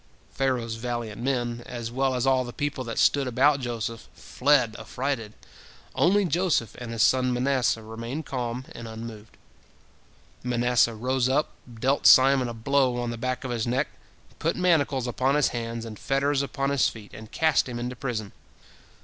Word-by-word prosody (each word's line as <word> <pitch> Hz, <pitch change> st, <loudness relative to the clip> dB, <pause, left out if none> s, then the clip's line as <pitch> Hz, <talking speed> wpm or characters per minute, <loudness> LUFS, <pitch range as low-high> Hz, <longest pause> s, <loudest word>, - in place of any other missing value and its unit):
Pharaoh's 125 Hz, -4 st, -1 dB
valiant 120 Hz, -2 st, -4 dB
men, 120 Hz, -2 st, -1 dB
as 120 Hz, -2 st, -5 dB
well 130 Hz, +1 st, 0 dB
as 125 Hz, 0 st, 0 dB
all 130 Hz, -1 st, +3 dB
the 120 Hz, -, -7 dB
people 145 Hz, 0 st, -3 dB
that 115 Hz, -1 st, -5 dB
stood 140 Hz, -2 st, +3 dB
about 135 Hz, +4 st, +3 dB
Joseph, 115 Hz, -2 st, -4 dB
fled 135 Hz, -7 st, +2 dB
affrighted, 115 Hz, -1 st, -3 dB, 0.6 s
only 200 Hz, +3 st, +3 dB
Joseph 170 Hz, -, +1 dB
and 120 Hz, -2 st, -6 dB
his 115 Hz, -2 st, +1 dB
son 130 Hz, -1 st, +3 dB
Manasseh 125 Hz, -2 st, +1 dB
remained 115 Hz, +7 st, -6 dB
calm 125 Hz, -1 st, -4 dB
and 115 Hz, -, -8 dB
unmoved. 110 Hz, -1 st, -9 dB, 1.1 s
Manasseh 120 Hz, -1 st, +2 dB
rose 130 Hz, +2 st, 0 dB
up, 140 Hz, +3 st, +1 dB, 0.2 s
dealt 130 Hz, +5 st, +1 dB
Simon 130 Hz, -1 st, +6 dB
a -, -, -5 dB
blow 125 Hz, +1 st, +1 dB
on 120 Hz, -1 st, -2 dB
the -, -, -4 dB
back 130 Hz, +3 st, -3 dB
of 130 Hz, -, -4 dB
his 120 Hz, -1 st, -1 dB
neck, 125 Hz, +3 st, 0 dB, 0.5 s
put 165 Hz, -, 0 dB
manacles 155 Hz, -8 st, +2 dB
upon 130 Hz, +3 st, +1 dB
his 150 Hz, -2 st, +3 dB
hands 115 Hz, -1 st, -4 dB
and 110 Hz, -2 st, -8 dB
fetters 140 Hz, +1 st, +1 dB
upon 140 Hz, 0 st, -2 dB
his 140 Hz, -2 st, +3 dB
feet, 105 Hz, -3 st, -12 dB
and 110 Hz, 0 st, -11 dB
cast 160 Hz, -4 st, +2 dB
him 120 Hz, -, -5 dB
into 125 Hz, +1 st, -4 dB
prison. 115 Hz, -6 st, -4 dB
125 Hz, 165 wpm, -26 LUFS, 115-135 Hz, 1.1 s, Simon